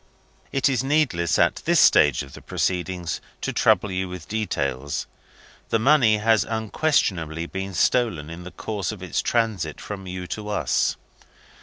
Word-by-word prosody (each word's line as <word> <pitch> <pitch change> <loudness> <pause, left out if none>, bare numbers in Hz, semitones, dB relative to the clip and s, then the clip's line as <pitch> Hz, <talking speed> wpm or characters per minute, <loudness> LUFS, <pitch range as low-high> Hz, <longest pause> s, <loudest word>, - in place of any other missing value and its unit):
"It 135 0 +2
is 130 -3 +1
needless, 130 - +1
at - - +3
this - - +4
stage 75 -3 +5
of 70 - -13
the - - -11
proceedings, 90 -2 -2 0.2
to - - -2
trouble 105 - +3
you 95 0 -2
with 90 -4 -8
details. 70 -11 -2 0.6
The - - +3
money 120 -3 +4
has 110 0 +3
unquestionably 100 - 0
been 95 +1 -5
stolen 95 -6 +1
in 85 +2 -8
the 90 - -8
course 100 +2 -4
of 100 -4 -9
its 90 - -1
transit 110 -10 -1
from 95 -2 -7
you 90 0 -5
to 105 +4 -6
us. 105 - +1
95 Hz, 155 wpm, -24 LUFS, 85-110 Hz, 0.6 s, stage